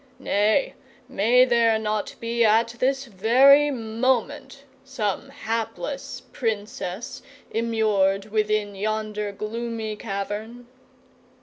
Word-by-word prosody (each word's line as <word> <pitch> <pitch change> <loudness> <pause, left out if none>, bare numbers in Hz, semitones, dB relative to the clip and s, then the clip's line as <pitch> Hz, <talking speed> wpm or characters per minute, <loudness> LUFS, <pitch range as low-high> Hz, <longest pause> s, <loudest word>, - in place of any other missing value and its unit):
Nay, 215 - +1 0.3
may 245 +5 +4
there 230 -3 +3
not 215 -1 -3
be, 235 0 0
at 225 +1 +4
this 270 +1 0
very 260 +7 +5
moment, 260 +3 -2 0.2
some 265 -2 -3
hapless 230 - -4
Princess 215 0 -4 0.3
immured 215 -3 +1
within 215 -1 0
yonder 210 0 -3
gloomy 220 +1 -4
cavern?" 210 +3 -5
225 Hz, 90 wpm, -24 LUFS, 210-245 Hz, 0.3 s, very